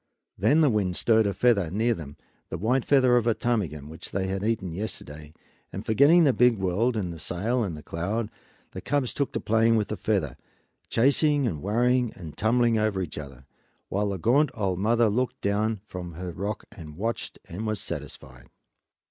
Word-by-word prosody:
Then 140 - +3
the 150 - +5
wind 95 -5 0
stirred 110 -2 +3
a 100 - -1
feather 105 -9 +2
near 110 +7 +1
them, 75 -8 -9 0.3
the 80 - -4
white 120 +7 +1
feather 130 -3 +4
of 120 -1 +1
a 115 - +3
ptarmigan 85 -12 -2
which 80 +2 -9
they 95 0 -2
had 95 +1 -3
eaten 105 -6 -1
yesterday, 75 -6 -6 0.4
and - - -6
forgetting 145 +10 +5
the 140 -4 +4
big 125 -2 +4
world 100 +6 0
and 90 -5 -2
the 80 - -10
sail 110 +10 -1
and 85 -7 -4
the 75 - -11
cloud, 105 +7 -3 0.4
the - - -7
cubs 140 -3 -1
took 140 - -1
to - - -1
playing 115 +1 +3
with 105 -2 0
the 105 - -3
feather, 85 - -1 0.5
chasing 140 +3 +3
and 80 -11 -2
worrying 120 +3 +1
and 80 -4 -9
tumbling 115 0 +2
over 105 -3 0
each 85 -5 -4
other, 70 -3 -10 0.4
while 100 +1 0
the 100 - -2
gaunt 135 - +3
old 95 -5 -1
mother 115 +4 +2
wolf 105 -1 +1
looked 130 -1 -1
down 105 +1 0
from 90 -4 -7
her 90 +2 -6
rock 100 +5 -4
and 75 -3 -11
watched 115 +4 -3
and 105 +6 -5
was 110 -2 -1
satisfied. 65 -7 -8
105 Hz, 195 wpm, -26 LUFS, 90-120 Hz, 0.5 s, the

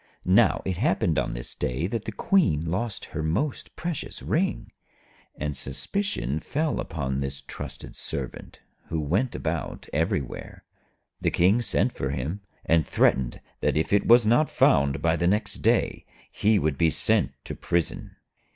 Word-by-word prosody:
Now - - +4
it 95 -2 -1
happened - - +2
on - - -2
this - - -5
day 65 +6 -2
that 110 +3 -3
the 110 - -3
Queen 105 - +2
lost 100 +6 -2
her 80 - -2
most 95 - -2
precious 170 -4 -5
ring, 185 +4 -1 0.6
and 75 0 -3
suspicion 75 - -2
fell 150 - -1
upon 70 -5 -2
this 70 0 -3
trusted 70 - -8
Servant - - -6 0.3
who 80 - -2
went 95 - 0
about - - -3
everywhere. 80 -3 -2 0.6
The - - +1
King 95 +7 +3
sent - - +1
for 65 - -3
him, 70 +9 -3 0.2
and 80 -1 +4
threatened 65 -4 +1 0.2
that - - +1
if 80 - 0
it 100 - +3
was 120 0 +7
not 120 +8 +4
found 70 0 +3
by 85 0 +3
the 85 - +1
next 105 +4 0
day, - - +1 0.2
he 105 +1 +3
would 75 -6 0
be 85 -1 +5
sent - - +2
to - - -5
prison. 85 -2 -2
85 Hz, 155 wpm, -26 LUFS, 70-115 Hz, 0.6 s, was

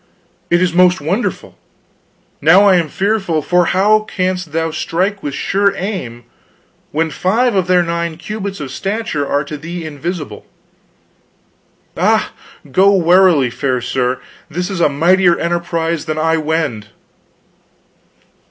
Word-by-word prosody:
It 175 +1 +3
is 175 -2 0
most 180 +1 +4
wonderful. 180 +11 -3 0.8
Now 180 +7 +6
am 175 -3 +3
I - - -13
fearful; 195 -5 -1
for 180 +2 +2
how 205 +5 +3
canst 185 -5 -3
thou 165 +1 -1
strike 185 +6 -2
with 145 -2 -4
sure 200 0 +1
aim 175 - -5 0.7
when 160 +1 -1
five 225 - +1
of 190 -3 0
their 180 -1 +3
nine 170 -1 -3
cubits 200 +2 -6
of 140 -3 -6
stature 195 - -3
are 145 +1 0
to 150 0 -7
thee 170 +2 -6
invisible? 155 +2 -6 1.5
Ah, - - +1 0.4
go 195 +7 +4
warily, 175 -7 +4
fair 130 +1 -1
sir; 125 +1 -1 0.3
this 180 +4 -3
is 185 -3 -3
a 160 - +4
mightier 175 +4 +3
emprise 170 -1 -2
than 155 -1 -3
I 160 +1 +1
wend." 155 -9 -2
170 Hz, 135 wpm, -16 LUFS, 155-190 Hz, 1.5 s, Now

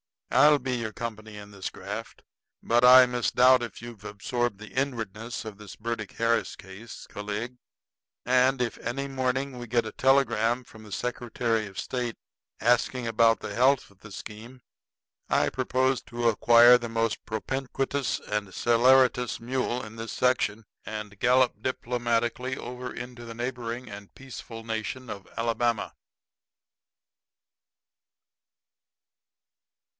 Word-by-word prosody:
I'll 150 0 +6
be 125 -1 -2
your 110 -2 -4
company 110 -2 -6
in 105 0 -10
this 100 -2 -5
graft. - - -7 0.4
But 120 +1 +3
I 125 0 +10
misdoubt 125 +1 +4
if 120 -2 -6
you've 115 -4 -10
absorbed 105 +2 -2
the 110 +1 -11
inwardness 115 -4 -3
of 105 -2 -7
this 105 -1 -11
Burdick 110 -2 -4
Harris 115 0 0
case, 100 +4 -11
Calig; 105 +4 -5 0.7
and 130 +1 +3
if 120 -2 -2
on - - -14
any 140 0 -2
morning 130 0 -2
we 120 - -7
get 120 +1 +1
a 110 - -5
telegram 125 -3 +2
from 110 -2 -15
the 105 - -13
Secretary 115 -1 -2
of 95 -1 -13
State 120 -2 -3 0.5
asking 125 +2 +2
about 115 0 +3
the 105 - -5
health 130 +1 +3
of 100 - -24
the 105 - -13
scheme, 115 +6 -10 0.7
I - - +3
propose 130 0 0
to 120 0 0
acquire 120 +2 +7
the 120 -1 -6
most 115 -1 -1
propinquitous 135 +4 -2
and 105 -1 -3
celeritous 125 +1 +3
mule 125 0 -2
in 110 +1 -10
this 115 0 -5
section 115 -4 +1 0.2
and 105 -2 -7
gallop 125 -3 +3
diplomatically 120 +1 -1
over 125 +1 -6
into 120 0 -8
the 115 -1 -8
neighboring 120 0 -4
and 100 -1 -11
peaceful 120 -3 -9
nation 115 +3 -4
of 100 -2 -8
Alabama." 115 0 0
120 Hz, 135 wpm, -27 LUFS, 110-125 Hz, 0.7 s, I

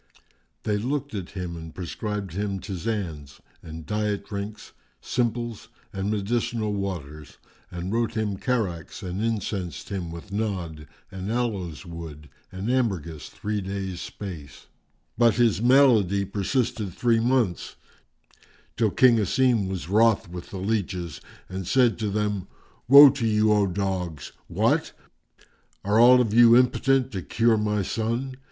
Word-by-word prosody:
They 105 -1 0
looked 140 +4 -3
at 95 -5 -5
him 90 -2 -4
and 80 -1 -9
prescribed 100 +1 -4
him 100 0 -2
ptisanes 90 -8 -5 0.2
and 80 -1 -9
diet 105 -1 -2
drinks, 100 +1 -6 0.3
simples 120 -2 -2 0.3
and 95 +1 -2
medicinal 110 +1 -1
waters 80 -7 -5 0.3
and 90 +3 -5
wrote 115 -1 0
him 105 -3 -1
characts 100 - -2
and 95 +3 -3
incensed 100 - -3
him 95 -4 -4
with 85 +4 -9
Nadd 90 -8 -3 0.2
and 95 +2 -5
aloes 100 -10 -2
wood 80 -4 -9 0.2
and 95 +3 -5
ambergris 90 - -1
three 105 0 -3
days' 95 -2 -4
space; 80 -9 -8 0.5
but 120 -2 +5
his 115 -5 +2
malady 115 -7 +4
persisted 105 +1 -1
three 115 -2 +2
months, 120 -6 0 1.0
till 115 -2 +3
King 120 +3 +5
Asim 115 -1 +2
was 95 -3 -4
wroth 110 +1 +3
with 85 0 -9
the 95 - -7
leaches 95 -4 -3 0.3
and 95 -1 -6
said 125 -2 +3
to 110 -2 -1
them, 105 -2 -2 0.4
"Woe 140 +2 +10
to 125 -4 -2
you, 105 0 +3
O 105 -1 +3
dogs! 90 -5 -3 0.2
What? - - +1 0.9
Are 105 +2 +3
all 125 +2 +8
of 110 -4 -1
you 120 0 +7
impotent 130 +1 +2
to 95 -4 -4
cure 115 +6 +2
my 105 -1 0
son? 115 +6 -2
105 Hz, 135 wpm, -25 LUFS, 90-115 Hz, 1.0 s, Woe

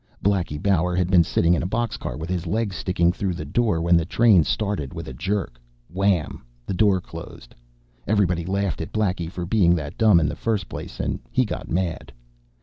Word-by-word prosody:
Blackie 90 -7 +1
Bauer 90 -1 +1
had 90 0 0
been 90 -2 +6
sitting 85 +1 +2
in 85 - +1
a 85 - -2
boxcar 115 -3 -3
with 80 +1 -5
his 90 -1 -2
legs 105 +1 -1
sticking 85 -1 +1
through 95 -1 -2
the 75 - -6
door 105 +2 +1
when 85 +1 +4
the 85 - +3
train 100 0 +4
started 100 -8 -2
with - - -6
a 65 - -6
jerk. 90 -6 -3 0.3
Wham, 95 -6 0 0.2
the - - -3
door 95 0 +3
closed. - - -11 0.5
Everybody 90 -5 +2
laughed 95 0 -1
at 80 - -6
Blackie 95 -6 -1
for 90 -1 -5
being 90 -3 +3
that 75 -4 -6
dumb 105 -6 +6
in 75 - +1
the 75 - -3
first 105 -5 -1
place, - - -8
and - - -2
he 130 0 +2
got - - -6
mad. 85 -1 -2
90 Hz, 200 wpm, -23 LUFS, 85-100 Hz, 0.5 s, been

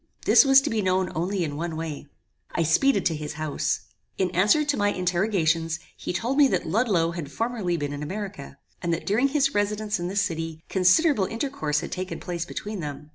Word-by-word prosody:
This - - +7
was 270 0 +7
to - - -2
be 220 -1 0
known 185 -1 +1
only 180 +3 -1
in 145 -3 -3
one 165 +1 -3
way. 155 -2 -5 0.5
I 165 - +2
speeded 265 - +3
to 165 - +2
his 150 0 -5
house. 155 -1 -2 0.4
In 185 -2 0
answer 205 - +3
to 290 -1 +1
my 205 -3 +2
interrogations, 175 -4 0 0.2
he - - -5
told 240 +10 -1
me 285 - +7
that - - -1
Ludloe 180 -3 +1
had 165 -4 -6
formerly 225 -6 -1
been 145 -2 -3
in 145 - -6
America, 195 +5 -6 0.2
and 170 - -1
that 165 - -8
during 225 +7 +2
his 275 -1 +1
residence 210 0 -1
in 175 - -3
this 200 +2 +1
city, 165 -2 -4
considerable 195 - +4
intercourse 225 - -2
had - - -6
taken 185 +1 -4
place 175 -2 -4
between 210 +3 -5
them. 150 -1 -6
185 Hz, 200 wpm, -25 LUFS, 165-215 Hz, 0.5 s, This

